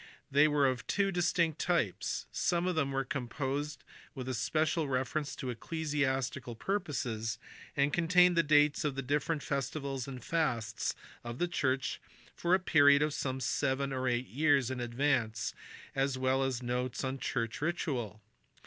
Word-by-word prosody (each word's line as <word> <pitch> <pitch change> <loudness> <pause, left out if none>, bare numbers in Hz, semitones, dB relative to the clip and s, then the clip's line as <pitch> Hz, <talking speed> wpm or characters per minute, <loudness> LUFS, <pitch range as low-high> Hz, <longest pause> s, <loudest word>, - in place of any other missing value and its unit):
They 145 +2 +6
were 145 -2 +3
of 125 -2 -2
two 200 -1 +1
distinct 170 -3 +1
types. 170 - 0
Some 175 0 +1
of 185 - +1
them 150 -4 0
were 135 0 -1
composed 140 +3 -3 0.3
with 130 -1 -3
special 155 +5 +1
reference 135 +3 -1
to 130 - -4
ecclesiastical 135 -2 -2
purposes, 125 - -2 0.4
and 140 +1 +2
contained 180 +1 +5
the 170 - +5
dates 150 -1 +4
of 145 -3 -1
the 135 - -3
different 145 +3 0
festivals 140 -1 -3
and 130 -2 -7
fasts 125 - -1 0.3
of 120 0 -6
the 175 - +1
church 135 -4 -1 0.3
for 175 +2 +2
a - - +1
period 145 -5 +5
of 150 -1 0
some 130 -2 -2
seven 135 +1 0
or 130 0 -1
eight 120 0 0
years 140 -2 +2
in 130 - -3
advance 120 -2 0 0.4
as 135 -1 0
well 130 +1 +2
as 130 -2 -1
notes 125 +1 -2
on 130 +1 -2
church 115 -2 -2
ritual. 125 - -2
140 Hz, 155 wpm, -32 LUFS, 125-155 Hz, 0.4 s, They